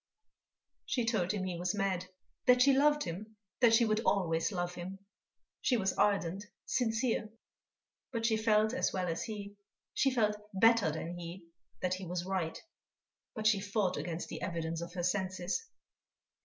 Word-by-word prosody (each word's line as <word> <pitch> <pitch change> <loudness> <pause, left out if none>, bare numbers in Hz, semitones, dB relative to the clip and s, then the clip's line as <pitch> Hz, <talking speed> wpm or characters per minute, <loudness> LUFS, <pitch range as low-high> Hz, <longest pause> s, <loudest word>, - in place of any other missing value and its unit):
She 245 -3 0
told 215 -6 +1
him 205 -3 -2
he 180 -2 -3
was 180 +3 -1
mad; 190 -3 -1 0.4
that 250 0 +7
she 275 0 +6
loved 295 +2 +4
him, 210 +6 -6 0.2
that 235 -3 +6
she 235 +1 +5
would 215 -1 +2
always 170 -5 +1
love 175 -2 -2
him. 180 +2 -6 0.6
She 250 - +3
was 195 -3 +1
ardent, 195 -1 +1 0.2
sincere; 225 -2 0 0.8
but 230 -3 -2
she 225 -1 +3
felt 220 0 +3
as 265 - +1
well 185 -1 -1
as 165 0 -2
he, 205 -2 -7 0.4
she 270 - +3
felt 215 -5 +1 0.2
better 225 -3 +5
than 170 +3 -5
he, 170 +1 -8 0.4
that 185 0 +1
he 185 0 -5
was 175 0 -3
right. 185 -4 -2 0.8
But 215 -2 -4
she 215 -2 +5
fought 200 -2 0
against 170 -1 -4
the - - -6
evidence 165 -1 -3
of 170 0 -6
her 180 -2 -3
senses. 185 - -1
195 Hz, 165 wpm, -33 LUFS, 175-225 Hz, 0.8 s, that